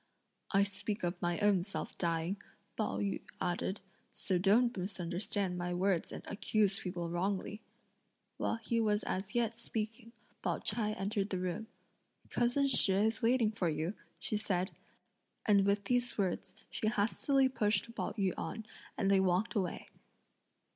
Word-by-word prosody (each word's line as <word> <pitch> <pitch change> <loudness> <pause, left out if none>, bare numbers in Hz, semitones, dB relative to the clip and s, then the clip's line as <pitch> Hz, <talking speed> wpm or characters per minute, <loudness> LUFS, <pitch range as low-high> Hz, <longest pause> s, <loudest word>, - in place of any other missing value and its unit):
"I 195 0 +5
speak 200 +1 -3
of 175 +1 -2
my 175 -1 +1
own 205 -3 +4
self 195 +3 -4
dying," 170 +3 -1 0.3
Pao 215 - -1
yü 200 -1 -1 0.2
added, 180 +3 -1 0.3
"so 185 -3 0
don't 230 +6 +4
misunderstand 185 0 -2
my 175 0 -2
words 185 -1 +1
and - - -7
accuse 205 -1 +1
people 175 -2 -4
wrongly." 195 +4 -1 0.8
While - - 0
he 230 +1 -1
was 210 -1 +2
as 190 +3 -3
yet 230 -1 +2
speaking, 230 0 -4 0.3
Pao - - 0
ch'ai 215 -2 +1
entered 200 +1 -1
the 190 - -1
room: 180 +4 -3 0.6
"Cousin 245 +4 +2
Shih 240 -7 +6
is 225 +2 +1
waiting 230 -2 +3
for 195 -6 0
you;" 160 +4 -1 0.2
she 215 - -1
said; 190 -2 0 0.7
and 200 -2 +5
with 200 0 +2
these 245 +3 0
words, 190 -1 -1 0.2
she 215 - -1
hastily 240 +5 +3
pushed 215 -2 +1
Pao - - -3
yü 195 -4 +1
on, 220 - -4 0.3
and 200 -3 +2
they 195 - +6
walked 190 +4 +2
away. 190 -6 -2
200 Hz, 150 wpm, -34 LUFS, 185-220 Hz, 0.8 s, Shih